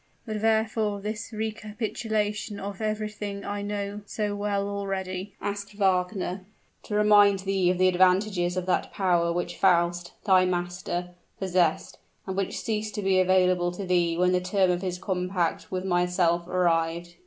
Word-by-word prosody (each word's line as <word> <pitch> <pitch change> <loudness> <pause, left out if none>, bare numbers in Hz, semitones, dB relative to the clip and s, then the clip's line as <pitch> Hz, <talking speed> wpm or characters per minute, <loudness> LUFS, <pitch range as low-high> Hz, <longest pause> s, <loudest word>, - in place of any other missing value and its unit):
"But 215 -3 -4
wherefore 220 -2 +1
this 215 +3 -5
recapitulation 215 -1 -3
of 200 +1 -6
everything 210 -2 -3
I 205 0 -3
know 205 0 -4
so 210 -1 -2
well 205 -1 -1
already?" 195 -1 -4
asked 200 0 -5
Wagner. 185 -1 0 0.4
"To 210 - -3
remind 205 -2 +5
thee 190 -2 +1
of 180 - +1
the 185 +1 +4
advantages 185 0 +2
of 180 - -1
that 185 - 0
power 175 -3 +1
which 175 0 -3
Faust, 175 -1 +2
thy 190 -3 +5
master, 175 0 -2 0.3
possessed, 180 -4 0 0.3
and 190 - -4
which 195 -1 -2
ceased 215 -1 -3
to 210 - -3
be 190 -1 +3
available 185 -1 +3
to 195 +2 -5
thee 175 -2 +1
when 180 +1 +3
the 180 0 +2
term 185 0 +2
of 175 0 -1
his 180 -2 -3
compact 180 -2 -2
with 185 0 -3
myself 175 -1 +1
arrived. 170 -1 0
190 Hz, 155 wpm, -26 LUFS, 180-205 Hz, 0.4 s, remind